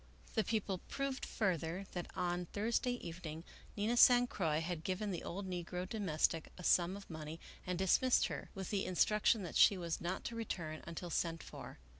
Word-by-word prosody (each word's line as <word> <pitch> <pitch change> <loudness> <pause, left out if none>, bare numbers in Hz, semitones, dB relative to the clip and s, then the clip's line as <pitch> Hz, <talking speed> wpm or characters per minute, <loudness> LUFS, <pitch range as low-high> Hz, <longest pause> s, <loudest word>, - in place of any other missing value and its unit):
The 220 - +2
People 205 -5 -1
proved 275 -1 -2
further, 180 -2 -1
that 175 -1 -4
on 175 0 -1
Thursday 230 +5 0
evening 165 -1 -6 0.3
Nina 215 +4 +1
San 245 0 +8
Croix 160 -10 0
had 165 -1 -3
given 195 +3 -1
the 175 - -4
old 190 +2 -4
negro 180 0 -3
domestic 165 -6 0
a 180 - -9
sum 180 +3 +3
of 200 - -11
money 160 0 -6 0.3
and 180 -1 -1
dismissed 190 +7 +4
her, - - -5
with 190 -2 -5
the 200 -2 0
instruction 210 +3 +3
that 175 - -6
she 200 - +7
was 170 -2 -3
not 175 +3 -2
to 235 - -4
return 165 -9 -4
until 170 +1 -5
sent 165 0 -1
for. - - -9
180 Hz, 180 wpm, -36 LUFS, 170-210 Hz, 0.3 s, San